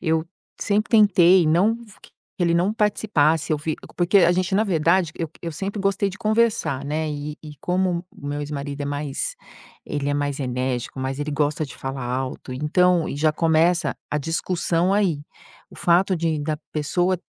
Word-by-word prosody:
eu 160 -2 +1 0.4
sempre 210 +2 0
tentei 190 -5 +6
não 180 +8 +4
f 205 - -17
q - - -17 0.3
que - - -2
ele 170 -1 +3
não 180 +5 +2
participasse, 165 -8 +1
eu - - +2
vi 155 +1 -3 0.2
porque 180 +3 +4
a 175 -1 +5
gente, 185 +1 0
na 215 - +3
verdade, 170 -1 +2
eu 165 -3 -4
eu 165 -2 -5
sempre 195 +5 -4
gostei 195 0 +1
de 190 - -11
conversar, 215 - +1
né, 155 +2 -2
e 150 0 -5
e 150 -1 -10
como 180 -1 0
o 145 - -11
meu 145 +1 -3
ex-marido 145 -1 -5
é - - -1
mais 145 -1 -3 0.5
ele 145 -1 -2
é 145 - 0
mais 145 -1 -2
enérgico, 125 0 -2
mas 130 +1 -3
ele 145 +1 -2
gosta 150 +1 0
de 135 - -10
falar 135 -1 -5
alto, 130 +1 -4
então, 170 +5 +2
e - - -4
já 155 +1 +3
começa 165 0 +2
a 150 - 0
discussão 170 +3 0
aí, 190 -7 +1 0.5
o - - -14
fato 180 +2 +3
de 160 -2 -1
da 155 +1 -2 0.2
pessoa, 175 +5 +1
160 Hz, 185 wpm, -23 LUFS, 145-185 Hz, 0.5 s, tentei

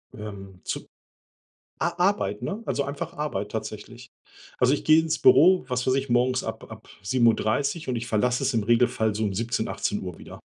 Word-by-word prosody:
Ähm, 100 -3 -9
zu - - -5 0.9
A 170 0 -1
Arbeit, 175 - 0
ne, 210 +3 -4
also 140 - 0
einfach 145 +4 -5
Arbeit 105 -9 -3
tatsächlich. 110 +2 -7 0.5
Also, 125 +2 +4
ich - - -7
gehe 155 +1 +6
ins 160 -1 -1
Büro, 180 +4 +6
was 125 0 -2
weiß 130 - +3
ich, 135 0 -2
morgens 125 +1 +2
ab - - -7
ab - - -12
7:30 120 - +1
und 125 - -1
ich 115 0 -3
verlasse 125 +3 +1
es 135 - +1
im 115 - +1
Regelfall 115 -1 +2
so 110 - -1
um 100 - -1
17:00, 115 +3 -2
18:00 90 -4 -3
wieder. - - -11
125 Hz, 180 wpm, -25 LUFS, 110-140 Hz, 0.9 s, gehe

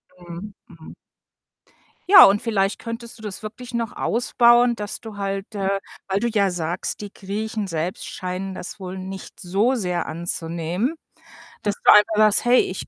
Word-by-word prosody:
Mhm, 175 +3 -9 0.2
mhm. 165 -3 -13 1.2
Ja, 400 - +11
und 200 +1 +5
vielleicht 200 -3 0
könntest 230 0 -7
du - - -13
das 210 0 -6
wirklich 235 +3 -8
noch 230 -2 -2
ausbauen, 240 0 +3
dass 205 -1 -5
du 220 -3 -9
halt 195 +1 -4
äh, 195 0 0 0.3
weil 195 +1 0
du 235 - +1
ja 200 -4 +2
sagst: 175 +3 -3
„Die 205 - -7
Griechen 210 +1 -4
selbst 165 +1 -3
scheinen 185 +1 -5
das 185 - -8
wohl 185 0 -6
nicht 190 0 -8
so 200 +8 +1
sehr 180 -6 -2
anzunehmen”, 170 - -3 0.7
dass 205 -1 -1
du - - +8
einfach 210 +1 +6
sagst: 215 +1 +4
„Hey, 245 +1 +6
ich 185 - -5
200 Hz, 165 wpm, -22 LUFS, 185-220 Hz, 1.2 s, Ja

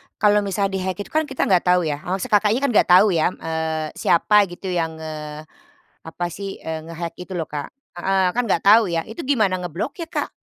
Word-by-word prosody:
kalau 210 0 +4
misal 200 -1 -1
di-hack 185 -1 -2
itu - - -18
kan 315 -1 +1
kita 265 - -2
nggak 185 -4 +3
tahu 180 -1 +4
ya, 150 -2 -2
maksudnya, 190 +4 -3
Kakaknya 215 +4 +1
kan 280 - +2
nggak - - +4
tahu 185 +4 +7
ya, 160 -2 +2
eee, 160 -1 -3
siapa 205 +4 +4
gitu 180 +1 -7
yang, 165 -2 -1
eee, 155 -1 -7 0.7
apa 175 - -4
sih 195 0 -6
nge-hack 165 +1 -5
itu 185 +1 -8
loh, 165 - -2
Kak, 145 -1 -6 0.3
heeh, 190 0 +2
kan 245 - 0
enggak 170 - +1
tahu 215 -1 +6
ya 165 -1 -1
itu 220 - -7
gimana 215 -9 +1
ngebloknya, 275 - -5
Kak? - - -2
185 Hz, 200 wpm, -21 LUFS, 160-205 Hz, 0.7 s, tahu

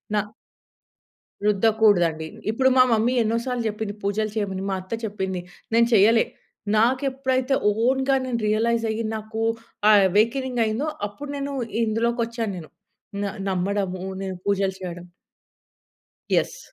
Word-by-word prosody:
నా - - +3 1.3
రుద్దకూడదండి. 200 -7 +3 0.2
ఇప్పుడు 260 +3 +3
మా 255 - +9
మమ్మీ 225 +3 +2
ఎన్నో 225 +1 0
సార్లు 250 -2 -2
చెప్పింది 210 -1 -4
పూజలు 210 +1 -1
చేయమని, 195 -3 -2
మా 190 - 0
అత్త 185 +4 -8
చెప్పింది 190 -3 -3 0.3
నేను 230 0 +5
చేయలే. 220 +3 +5 0.5
నాకు 255 +5 +3
ఎప్పుడైతే 260 0 0 0.3
ఓన్‌గా 265 +1 +2
నేను 240 -2 -2
రియలైజ్ 230 +2 +1
అయ్యి 220 +1 -2
నాకు 220 +1 -5 0.5
ఆ - - +8 0.2
అవేకెనింగయిందో, 235 - +1 0.2
అప్పుడు 285 +8 -9
నేను 280 0 -3 0.3
ఇందులోకొచ్చాను 230 0 -1
నేను. 160 -3 -9 0.5
న - - -1 0.3
నమ్మడము 185 0 -1 0.2
నేను 190 -1 -4
పూజలు 195 -1 +1
చేయడం. 175 -1 -6 1.3
యెస్. - - +1
220 Hz, 120 wpm, -24 LUFS, 200-240 Hz, 1.3 s, మా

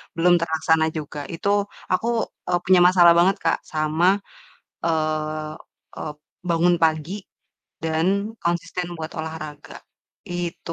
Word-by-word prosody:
belum 175 +2 +4
terlaksana 160 -1 +2
juga. 150 -1 -6
Itu 185 +4 -2 0.4
aku, 185 +6 0 0.4
eee, 175 0 +2
punya 185 0 +6
masalah 175 -2 +7
banget, 190 +3 +4
Kak, 165 - +2
sama, 155 +2 +1 0.8
eee 155 -1 -1 0.4
eee, 150 - -5 0.4
bangun 170 +1 +4
pagi 160 +1 +1 0.7
dan 160 +1 0 0.4
konsisten 175 +1 -1
buat 160 0 -5
olahraga. 155 -2 -7 0.6
Itu 175 -1 -4
160 Hz, 110 wpm, -23 LUFS, 155-175 Hz, 0.8 s, masalah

